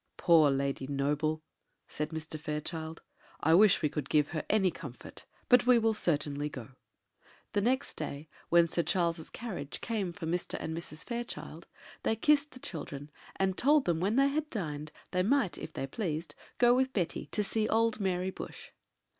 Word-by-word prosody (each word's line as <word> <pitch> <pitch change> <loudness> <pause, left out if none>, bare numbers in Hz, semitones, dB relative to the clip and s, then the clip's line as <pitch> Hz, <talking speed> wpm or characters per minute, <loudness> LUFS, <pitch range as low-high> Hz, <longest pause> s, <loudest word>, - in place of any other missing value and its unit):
"Poor 160 -4 +6
Lady 135 -1 -1
Noble!" 150 +3 0 0.4
said 150 0 -3
Mr. 160 -1 -5
Fairchild; 160 +1 -4 0.4
"I 160 - +3
wish 200 +1 +6
we - - +4
could 145 -1 -4
give 150 -2 +3
her 155 -3 -3
any 195 -4 +3
comfort! - - -9 0.2
but 250 -1 +5
we 250 -1 +7
will 225 -1 +3
certainly 150 -6 0
go." 125 -5 -8 0.8
The 205 - +2
next 260 +6 0
day, 145 +3 -5 0.2
when 170 0 +6
Sir 170 - 0
Charles's 170 -2 0
carriage 180 -12 -5
came 210 -6 -2
for 170 -1 -7
Mr. 175 +2 -1
and 160 - -4
Mrs. 155 -2 -5
Fairchild, 240 0 -5 0.3
they 220 - +1
kissed 295 +5 +3
the 255 - -11
children, 150 - -6 0.2
and 190 -1 +1
told 290 +5 +4
them 170 -2 +1
when 200 +6 +1
they 275 +1 +5
had 305 +1 -1
dined, 155 - -4 0.2
they 180 - +2
might, 225 -1 +2
if - - -7
they - - -3
pleased, 160 - -3 0.2
go 240 0 +6
with 260 +1 +1
Betty 180 -5 -2
to 210 - -1
see 215 +2 0
old 225 0 +2
Mary 185 -1 0
Bush. - - -9
175 Hz, 175 wpm, -31 LUFS, 155-220 Hz, 0.8 s, we